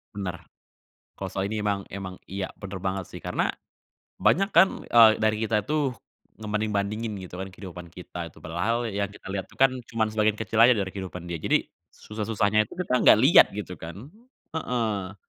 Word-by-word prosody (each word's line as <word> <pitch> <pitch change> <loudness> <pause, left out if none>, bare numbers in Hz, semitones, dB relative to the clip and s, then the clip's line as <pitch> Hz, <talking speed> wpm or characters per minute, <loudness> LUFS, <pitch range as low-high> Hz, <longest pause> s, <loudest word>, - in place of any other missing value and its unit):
Benar, 90 -4 -5 0.8
kalau - - -3
soal 100 +1 -3
ini 110 - -2
emang 100 -2 -1
emang 95 -1 -6
iya 95 0 -4
benar 95 -1 -7
banget 95 +1 -2
sih - - -8
karena - - -1 0.7
banyak 195 +4 +3
kan, 190 +1 +4
eee, 115 -2 +7
dari 110 0 +3
kita 105 -1 +1
tuh 145 +1 0 0.4
ngebanding-bandingin 105 0 -2
gitu 90 -1 -9
kan 95 - -4
kehidupan 90 -2 -9
kita 90 -1 -7
tuh, - - -17
padahal 115 +8 -1
yang 100 0 -1
kita 100 - -15
lihat 95 -1 -3
itu - - -20
kan 135 0 +6 0.2
cuman 110 -2 -1
sebagian 110 -1 +2
kecil 110 0 -3
aja 120 +2 +8
dari 100 -3 -2
kehidupan 90 -3 -7
dia. 85 - -3
Jadi - - +2 0.3
susah-susahnya 105 0 0
itu - - -12
kita 175 -8 0
nggak - - +9
lihat 140 +6 +8
gitu 95 -4 -6
kan, 90 - -9 0.4
heeh. 110 - -2
105 Hz, 175 wpm, -26 LUFS, 95-115 Hz, 0.8 s, nggak